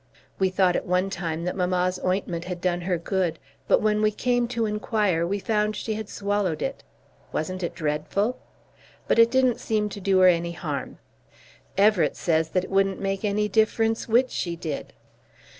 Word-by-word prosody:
We 190 -1 +3
thought 185 -1 +2
at - - -2
one 180 +2 +1
time 170 -3 -3
that 180 - -2
mamma's 180 0 0
ointment 180 -2 -1
had 180 -1 -5
done 175 -1 0
her 180 0 0
good, 170 -1 -1 0.3
but - - +3
when 210 0 +2
we 215 - +4
came 245 +3 0
to 235 -2 -1
inquire, 210 -5 0
we 200 +3 -1
found 210 +1 0
she 220 - -3
had 215 -1 -5
swallowed 200 -5 -1
it. 270 - -4 0.5
Wasn't 185 +4 -3
it 175 - -3
dreadful? 165 +9 -1 0.7
But - - +3
it 230 0 +7
didn't 255 -1 +2
seem 210 -1 0
to 200 - -8
do 190 0 +2
her 185 - +8
any 170 -1 +2
harm. 170 - -5 0.8
Everett 205 -2 +4
says 160 -1 +1
that 185 +2 0
it - - -8
wouldn't 195 0 +2
make 195 +1 -2
any 210 0 +1
difference 225 +2 +1
which 240 +3 +3
she 170 -2 -2
did. 160 -3 -5
195 Hz, 180 wpm, -25 LUFS, 175-215 Hz, 0.8 s, her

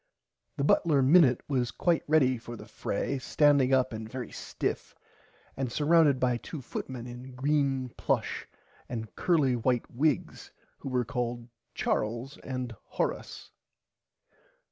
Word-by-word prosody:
The 140 - 0
butler 145 -1 +3
Minnit 135 -3 +6
was 125 -4 0
quite 170 +4 +1
ready 130 -5 +3
for 120 +1 -8
the - - -10
fray 140 - -3
standing 140 -1 +3
up 130 -2 +3
very 110 +3 -6
stiff - - -4 0.6
and 130 -3 -2
surrounded 150 -1 +4
by 125 -2 +2
two 150 - -7
footmen 125 -1 -6
in 125 +1 -9
green 135 -1 +1
plush - - -1 0.4
and 110 -5 -5
curly 150 -8 +2
white 120 0 0
wigs 145 +2 -1 0.3
who - - -6
were 125 -2 0
called 120 -2 -3 0.3
Charles 120 +6 -2
and 125 -3 -5
Horace. - - -4
130 Hz, 125 wpm, -29 LUFS, 120-145 Hz, 0.6 s, Minnit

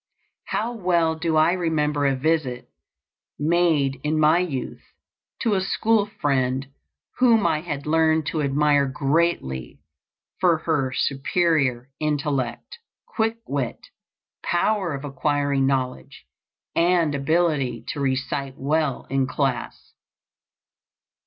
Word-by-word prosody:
How 225 +3 -2
well 175 -6 +1
do 160 0 -1
I 155 +2 +5
remember 150 -5 0
a 135 - +1
visit, 135 -3 -1 0.7
made 150 -4 +2
in 155 +1 0
my 155 +3 +5
youth, 155 -8 -4 0.6
to 225 -4 +2
a 190 - +1
school 210 +2 +1
friend 130 -2 0 0.5
whom 230 -4 +4
I 155 - +1
had 145 -4 -5
learned 160 0 +2
to 155 - -1
admire 145 0 +2
greatly 135 - -1 0.6
for 175 -3 +4
her 145 -6 +1
superior 135 -2 0
intellect, 145 - -2 0.3
quick 225 0 -1
wit, 135 -4 -4 0.5
power 175 -2 0
of 140 +1 -7
acquiring 140 -1 0
knowledge, 130 -2 -3 0.5
and 170 -3 +3
ability 140 -5 0
to 145 - -4
recite 135 0 -2
well 150 0 -1
in 135 -1 +1
class. 135 -3 -3
150 Hz, 110 wpm, -23 LUFS, 135-170 Hz, 0.7 s, I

